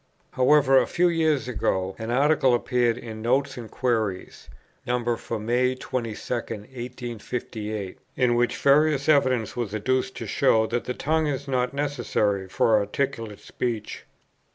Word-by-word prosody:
However, 135 0 +5
a 125 - 0
few 175 0 +2
years 160 -5 +1
ago 95 -5 -1
an 110 0 -5
Article 135 0 +3
appeared 120 -1 +1
in 110 -3 -8
"Notes 135 +4 +1
and 120 -3 -8
Queries" 110 -7 -2 0.4
(No. 120 -1 0
for 115 0 -5
May 125 +4 +1
22, 120 -4 -4 0.2
1858), 115 -3 -5 0.2
in 125 -1 +2
which 120 0 +1
various 145 0 +3
evidence 130 -7 +2
was 115 -4 -3
adduced 130 +5 0
to - - -5
show 110 0 +3
that 120 +2 -2
the 125 - -3
tongue 155 +1 0
is 140 -1 -3
not 130 0 -1
necessary 120 -9 -1
for 105 +3 +3
articulate 110 -1 -3
speech. 115 -3 -4
120 Hz, 140 wpm, -25 LUFS, 110-135 Hz, 0.4 s, However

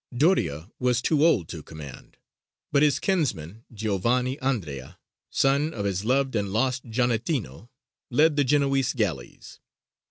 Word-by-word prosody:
Doria 100 - +1
was 125 -1 +2
too 145 +4 +2
old 120 - +3
to 80 - -6
command, 75 -4 -11 0.5
but 140 - +3
his 145 -3 +4
kinsman, 115 - -2
Giovanni 115 +5 0
Andrea, 80 - -3 0.3
son 140 +3 +1
of 100 -2 -3
his 95 -1 -1
loved 130 +2 +1
and 100 -2 -1
lost 125 +4 0
Giannettino, 115 - -2 0.4
led 150 +4 +3
the 145 - +3
Genoese 135 -1 +2
galleys. 100 - -4
125 Hz, 130 wpm, -25 LUFS, 100-140 Hz, 0.5 s, his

